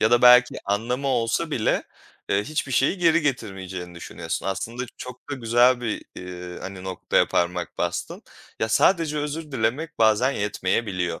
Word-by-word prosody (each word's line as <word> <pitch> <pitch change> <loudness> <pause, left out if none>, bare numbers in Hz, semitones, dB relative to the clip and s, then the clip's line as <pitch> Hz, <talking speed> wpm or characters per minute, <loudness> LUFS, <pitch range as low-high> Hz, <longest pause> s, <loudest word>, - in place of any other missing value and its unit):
ya 110 - +3
da 120 - +4
belki 125 0 +7
anlamı 120 +7 -1
olsa 125 +6 0
bile, 115 -7 +1 0.5
eee, 100 +1 +1
hiçbir 150 -1 -3
şeyi 135 +9 +2
geri 170 -1 +4
getirmeyeceğini 95 -9 -4
düşünüyorsun. 85 - -5
Aslında 110 +6 -3
çok 125 +2 -10
da - - -1
güzel 120 0 +3
bir, 115 -3 -3
iii, 90 -1 -7
hani, 95 -1 -7
noktaya 95 -1 +1
parmak 90 0 -1
bastın. 85 0 -3 0.4
Ya, 110 - +1
sadece 155 - +3
özür 150 +1 -4
dilemek 130 +6 -1
bazen 110 +4 +4
yetmeyebiliyor. 95 -5 -1
115 Hz, 150 wpm, -24 LUFS, 95-135 Hz, 0.5 s, belki